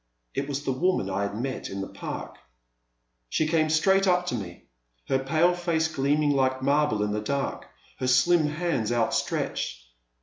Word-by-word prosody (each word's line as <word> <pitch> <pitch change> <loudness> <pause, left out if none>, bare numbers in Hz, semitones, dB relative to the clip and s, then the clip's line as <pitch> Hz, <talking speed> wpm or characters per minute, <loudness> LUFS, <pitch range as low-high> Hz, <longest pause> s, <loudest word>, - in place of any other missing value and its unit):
It 140 +1 -3
was 140 0 -3
the - - +1
woman 130 - 0
I 95 +1 -1
had 100 +1 -3
met 130 +1 -3
in 95 0 -4
the 95 - -4
Park. - - -7 0.9
She 155 - +1
came 155 0 +2
straight 190 +5 +3
up 180 -1 +3
to 180 - -2
me, 90 -6 -7 0.4
her 135 - +2
pale 155 +6 +2
face 170 -2 0
gleaming 145 0 +1
like 130 -1 +1
marble 140 -6 +2
in 105 - -1
the 105 0 -1
dark, 140 +5 -2 0.3
her 130 - -1
slim 150 +6 +4
hands 150 -8 -1
outstretched. 115 - -1
140 Hz, 170 wpm, -26 LUFS, 120-160 Hz, 0.9 s, slim